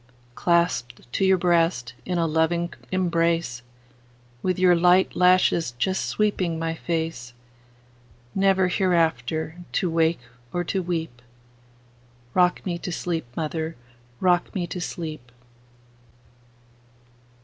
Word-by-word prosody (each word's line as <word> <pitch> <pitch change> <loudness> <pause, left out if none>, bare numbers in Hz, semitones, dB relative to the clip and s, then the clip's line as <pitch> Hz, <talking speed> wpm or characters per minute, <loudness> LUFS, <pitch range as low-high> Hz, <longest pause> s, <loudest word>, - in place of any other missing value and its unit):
Clasped 170 -7 0
to - - 0
your 190 0 +5
heart 165 -8 +1
in 180 -1 -1
a 170 - +2
loving 165 +2 0 0.2
embrace, 170 -7 0 0.8
With 185 -1 0
your 180 -1 +5
light 180 +2 +4
lashes 180 -6 +3
just 185 +10 -1
sweeping 190 -6 0
my 165 0 -2
face, 160 -7 -3 1.0
Never 195 -1 +3
hereafter 165 - 0 0.2
to 180 - 0
wake 165 -2 +2 0.3
or 175 - -1
to 190 +2 -1
weep;—Rock 120 -1 -4
me 175 -2 -2
to 180 - -5
sleep, 165 -4 -3
mother,—rock 155 - -2
me 180 -3 -1
to 180 +1 -6
sleep! 155 -8 -6
165 Hz, 105 wpm, -24 LUFS, 125-180 Hz, 1.0 s, your